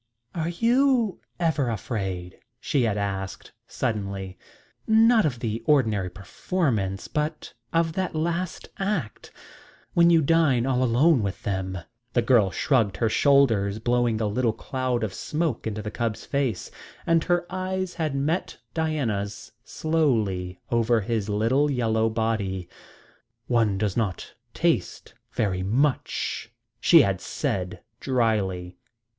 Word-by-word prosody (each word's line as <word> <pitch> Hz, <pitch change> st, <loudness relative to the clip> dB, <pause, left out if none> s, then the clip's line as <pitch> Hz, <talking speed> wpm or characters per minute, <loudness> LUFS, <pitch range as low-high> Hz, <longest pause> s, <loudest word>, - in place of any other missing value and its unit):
"Are 165 Hz, -1 st, -2 dB
you 235 Hz, +2 st, +2 dB, 0.2 s
ever 155 Hz, -7 st, +1 dB
afraid?" 95 Hz, -5 st, -4 dB, 0.2 s
she 140 Hz, +1 st, 0 dB
had 105 Hz, -2 st, 0 dB
asked 95 Hz, -2 st, -4 dB, 0.2 s
suddenly 100 Hz, -5 st, -3 dB, 0.5 s
"not 225 Hz, 0 st, +5 dB
of 125 Hz, -5 st, -3 dB
the 115 Hz, -1 st, -2 dB
ordinary 110 Hz, -10 st, +2 dB
performance, 100 Hz, -, -2 dB
but 150 Hz, +1 st, -3 dB, 0.2 s
of 165 Hz, -1 st, +1 dB
that 185 Hz, -1 st, -2 dB
last 170 Hz, +3 st, -2 dB
act, 190 Hz, -, -3 dB, 0.6 s
when 170 Hz, 0 st, +5 dB
you 165 Hz, -2 st, +5 dB
dine 140 Hz, -6 st, +3 dB
all 130 Hz, -1 st, +1 dB
alone 130 Hz, +4 st, +4 dB
with 100 Hz, -2 st, -4 dB
them?" 95 Hz, -2 st, -2 dB, 0.4 s
The 120 Hz, -, +2 dB
girl 115 Hz, -5 st, +4 dB
shrugged 110 Hz, -1 st, +1 dB
her 115 Hz, -, +1 dB
shoulders, 110 Hz, -6 st, +3 dB
blowing 120 Hz, 0 st, +1 dB
a 110 Hz, -, 0 dB
little 110 Hz, +2 st, +1 dB
cloud 125 Hz, 0 st, -2 dB
of 105 Hz, -4 st, -2 dB
smoke 150 Hz, -, -2 dB
into 110 Hz, -1 st, -4 dB
the 105 Hz, -, -4 dB
cub's 115 Hz, -2 st, -3 dB
face, 135 Hz, -9 st, -2 dB, 0.3 s
and 165 Hz, -1 st, +3 dB
her 175 Hz, -1 st, +1 dB
eyes 185 Hz, 0 st, -2 dB
had 155 Hz, -4 st, -2 dB
met 155 Hz, +6 st, -1 dB, 0.2 s
Diana's 115 Hz, -12 st, -2 dB
slowly 110 Hz, -, 0 dB
over 115 Hz, -1 st, +2 dB
his 110 Hz, 0 st, -2 dB
little 115 Hz, +8 st, +2 dB
yellow 115 Hz, -4 st, +1 dB
body. 110 Hz, -5 st, -1 dB, 0.8 s
"One 115 Hz, -5 st, +2 dB
does 100 Hz, -2 st, -1 dB
not 105 Hz, -6 st, -2 dB, 0.2 s
taste -, -, -1 dB, 0.2 s
very 95 Hz, -3 st, 0 dB
much," 125 Hz, +3 st, -1 dB, 0.3 s
she 165 Hz, +4 st, +7 dB
had 95 Hz, -2 st, -1 dB
said 105 Hz, -8 st, -3 dB, 0.2 s
drily. 100 Hz, -8 st, 0 dB
120 Hz, 125 wpm, -25 LUFS, 100-155 Hz, 0.8 s, she